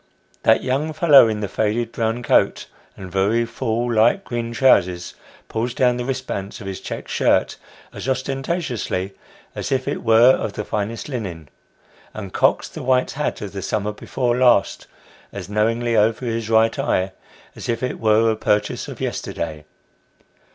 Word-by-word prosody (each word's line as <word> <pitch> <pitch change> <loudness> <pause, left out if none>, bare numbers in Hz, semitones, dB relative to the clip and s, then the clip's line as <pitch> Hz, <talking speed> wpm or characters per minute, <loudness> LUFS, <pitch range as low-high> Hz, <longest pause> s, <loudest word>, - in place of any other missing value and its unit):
That 110 - +4
young 140 +5 -1
fellow 150 -6 +7
in 110 -1 -2
the 105 - -2
faded 110 +3 -1
brown 115 +1 -2
coat, - - +2 0.3
and 95 -2 -9
very 100 +5 +1
full 120 0 -2
light 115 - +3
green 120 -5 -4
trousers, 90 -8 +2 0.3
pulls 120 +2 -3
down 125 -2 +2
the 125 - -3
wrist 130 0 -3
bands 100 -3 -5
of 105 - -9
his 95 -1 -6
check - - -6
shirt, - - +1 0.4
as - - -5
ostentatiously 130 - -2 0.4
as - - -5
if 130 -1 0
it - - -2
were 115 +2 +6
of 110 - -1
the 105 - -5
finest 105 +2 -3
linen, 95 - -6 0.7
and 100 -3 -7
cocks - - +2
the - - -9
white 130 0 +1
hat 150 +2 -3
of 100 - -5
the 100 - -6
summer 105 +2 -2
before 120 +3 -2
last 125 -6 +2 0.4
as - - -7
knowingly 115 +3 +1
over 110 +3 +2
his 115 -1 -3
right 115 0 +3
eye, 95 +1 0 0.4
as - - -8
if 115 +1 -1
it 125 - -3
were 110 0 +3
a - - -1
purchase 105 -1 0
of - - -8
yesterday. 80 -2 -4
115 Hz, 165 wpm, -21 LUFS, 105-125 Hz, 0.7 s, fellow